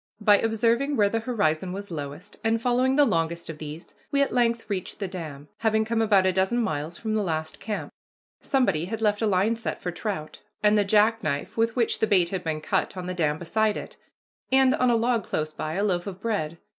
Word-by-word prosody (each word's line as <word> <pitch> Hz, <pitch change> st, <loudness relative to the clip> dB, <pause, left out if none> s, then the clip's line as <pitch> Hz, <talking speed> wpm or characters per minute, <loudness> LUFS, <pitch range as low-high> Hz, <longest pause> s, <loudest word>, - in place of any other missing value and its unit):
By 205 Hz, -1 st, +5 dB
observing 230 Hz, +5 st, +1 dB
where 205 Hz, -2 st, +4 dB
the 225 Hz, -, 0 dB
horizon 185 Hz, -7 st, 0 dB
was 200 Hz, 0 st, -7 dB
lowest, 150 Hz, +6 st, -7 dB
and 225 Hz, 0 st, +2 dB
following 250 Hz, +2 st, +2 dB
the 290 Hz, 0 st, +6 dB
longest 165 Hz, -4 st, -1 dB
of 155 Hz, -, -12 dB
these, 155 Hz, +2 st, -8 dB, 0.2 s
we 280 Hz, 0 st, +3 dB
at 275 Hz, -, -3 dB
length 235 Hz, -2 st, +1 dB
reached 195 Hz, -2 st, -4 dB
the 200 Hz, -, -2 dB
dam, 155 Hz, -6 st, -7 dB
having 220 Hz, -1 st, +2 dB
come 225 Hz, 0 st, 0 dB
about 205 Hz, -4 st, +4 dB
a 185 Hz, -, +3 dB
dozen 190 Hz, +6 st, +1 dB
miles 160 Hz, -7 st, -2 dB
from 220 Hz, -1 st, -3 dB
the 215 Hz, -, +1 dB
last 160 Hz, -4 st, -3 dB
camp. 215 Hz, -2 st, -4 dB, 0.5 s
Somebody 245 Hz, -, +1 dB
had 220 Hz, +4 st, -4 dB
left 210 Hz, 0 st, +2 dB
a 220 Hz, -, +2 dB
line 205 Hz, +3 st, +2 dB
set 230 Hz, -, -4 dB
for 180 Hz, -, -3 dB
trout, 175 Hz, -4 st, -5 dB, 0.2 s
and 210 Hz, 0 st, +5 dB
the 205 Hz, -, +4 dB
jackknife 210 Hz, -8 st, +1 dB
with 225 Hz, 0 st, +1 dB
which 235 Hz, -3 st, +1 dB
the 220 Hz, -, +2 dB
bait 180 Hz, -5 st, +3 dB
had 185 Hz, -1 st, -3 dB
been 155 Hz, -1 st, -2 dB
cut 185 Hz, -, -1 dB
on 180 Hz, -, -4 dB
the 185 Hz, -, -3 dB
dam 155 Hz, -4 st, 0 dB
beside 215 Hz, +5 st, 0 dB
it, -, -, -8 dB, 0.5 s
and, 265 Hz, 0 st, +5 dB
on 255 Hz, -, +2 dB
a 240 Hz, -, +4 dB
log 230 Hz, -1 st, +1 dB
close 155 Hz, -3 st, -3 dB
by, 155 Hz, 0 st, -4 dB
a 200 Hz, -, 0 dB
loaf 180 Hz, -2 st, 0 dB
of 190 Hz, -2 st, -6 dB
bread. 190 Hz, -8 st, -2 dB
205 Hz, 220 wpm, -26 LUFS, 170-225 Hz, 0.5 s, the